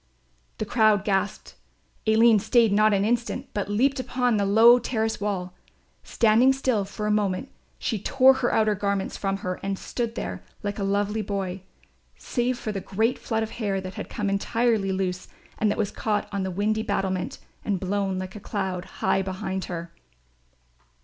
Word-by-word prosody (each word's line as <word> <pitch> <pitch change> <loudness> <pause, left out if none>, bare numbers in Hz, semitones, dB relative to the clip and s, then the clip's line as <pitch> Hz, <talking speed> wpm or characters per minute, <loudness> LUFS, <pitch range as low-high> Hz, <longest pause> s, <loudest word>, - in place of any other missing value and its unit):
The 215 - -2
crowd 215 -2 +3
gasped. 195 0 -1 0.5
Aline 220 0 +6
stayed 225 0 +3
not 215 +1 +4
an 200 0 +2
instant, 240 +3 -1
but 205 -1 -2
leaped 265 +7 +2
upon 250 -2 0
the 200 -1 +1
low 230 +4 +7
terrace 220 -3 -2
wall. 185 -3 -2 0.5
Standing 235 +4 +4
still 255 -6 0
for 210 +2 -5
a 210 - +1
moment 210 +4 0 0.3
she 220 - -2
tore 265 +3 +5
her 240 - +2
outer 215 -1 +3
garments 200 -1 -2
from 195 -1 -1
her 185 0 -2
and 195 0 -2
stood 235 +2 -4
there 90 +1 -4 0.2
like 205 +1 -3
a - - -1
lovely 205 +2 0
boy, 195 -2 -3 0.6
save 245 0 -1
for 220 -3 -4
the 195 -2 -4
great 220 +7 0
flood 225 -1 -1
of 220 - -5
hair 200 -4 -2
that 185 0 -7
had - - -7
come 210 -2 -3
entirely 205 +1 +1
loose 185 -1 -2 0.3
and 215 - +2
that - - -1
was 205 -2 -1
caught 210 -2 -1
on 200 -1 -2
the 190 - -2
windy 210 +4 0
battlement 190 -3 -2 0.3
and 200 -3 -1
blown 195 0 -1
like 185 +1 -6
a - - -6
cloud 190 -3 -3
high 195 - 0
behind 190 0 -3
her. 170 -1 -6
205 Hz, 175 wpm, -25 LUFS, 195-225 Hz, 0.6 s, low